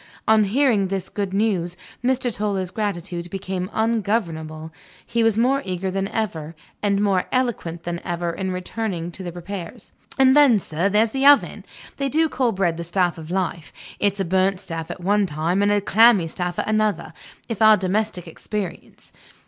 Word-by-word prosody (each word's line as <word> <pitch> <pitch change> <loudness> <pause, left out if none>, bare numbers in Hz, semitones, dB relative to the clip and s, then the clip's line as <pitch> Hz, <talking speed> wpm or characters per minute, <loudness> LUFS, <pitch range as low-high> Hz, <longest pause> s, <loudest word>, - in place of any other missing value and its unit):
On 220 -1 +5
hearing 220 -2 +2
this 190 -1 -3
good 200 -2 -3
news, 190 -4 0 0.3
Mr. 250 -1 +1
Toller's 200 -3 -2
gratitude 175 -4 -3
became 185 0 -4
ungovernable: 175 -9 -1 0.3
he 235 - -1
was 225 -2 +3
more 260 +4 +2
eager 185 0 -3
than 195 +1 -1
ever, 170 -8 -3 0.3
and 200 -1 +1
more 195 -3 +2
eloquent 225 -10 -1
than 170 0 -4
ever, 175 0 -2
in 190 +2 -4
returning 185 -1 -3
to 190 - -9
the 175 -2 -5
repairs. 180 +4 -8 0.3
"And 265 0 +5
then, 280 -7 +6
sir, 170 +2 -1
there's 215 +2 +2
the 270 +2 +2
oven. 285 -1 +5 0.3
They 275 0 -1
do 320 +3 +2
call 255 -3 +1
bread 180 -5 0
the 170 - -4
staff 175 -1 0
of 160 0 -9
life. 180 -3 -2 0.3
It's 200 -1 0
a 195 - 0
burnt 190 +2 +1
staff 165 -4 -6
at - - -7
one 205 +2 +2
time, 165 +5 0
and 205 0 +3
a 205 - +3
clammy 210 -3 +5
staff 175 +2 -4
at - - -2
another, 215 -1 0 0.3
in 230 - -3
our 215 -1 +7
domestic 185 -1 -2
experience. 195 +3 -6
195 Hz, 175 wpm, -22 LUFS, 175-220 Hz, 0.3 s, our